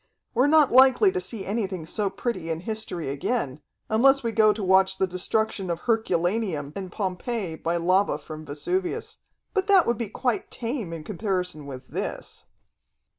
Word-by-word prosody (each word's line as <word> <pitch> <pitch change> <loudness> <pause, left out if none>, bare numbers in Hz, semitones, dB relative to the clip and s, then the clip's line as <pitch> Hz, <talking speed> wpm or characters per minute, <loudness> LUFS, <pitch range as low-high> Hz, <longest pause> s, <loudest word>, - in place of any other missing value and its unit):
We're 255 +3 +3
not 300 -2 +5
likely 265 - +6
to 375 -1 -2
see 215 - -6
anything 195 -5 -2
so 205 +4 -1
pretty 195 -4 -3
in 165 0 -2
history 200 -7 -3
again, 140 - -2 0.3
unless 270 +5 +4
we 230 - 0
go 215 -1 +5
to 210 0 -4
watch 190 0 +4
the 190 - +2
destruction 190 +2 -1
of 170 0 -2
Herculaneum 185 -7 0
and 190 -2 -6
Pompeii 190 -1 -3
by 170 +2 -1
lava 185 +1 +2
from 155 +1 -9
Vesuvius. 175 +6 -3 0.3
But 390 -2 0
that 390 -3 +6
would 235 -2 0
be 230 -4 -2
quite 245 +2 -1
tame 230 - -4
in 165 -2 -6
comparison 180 -6 -3
with 130 -2 -8
this." - - -5
195 Hz, 165 wpm, -25 LUFS, 170-230 Hz, 0.3 s, likely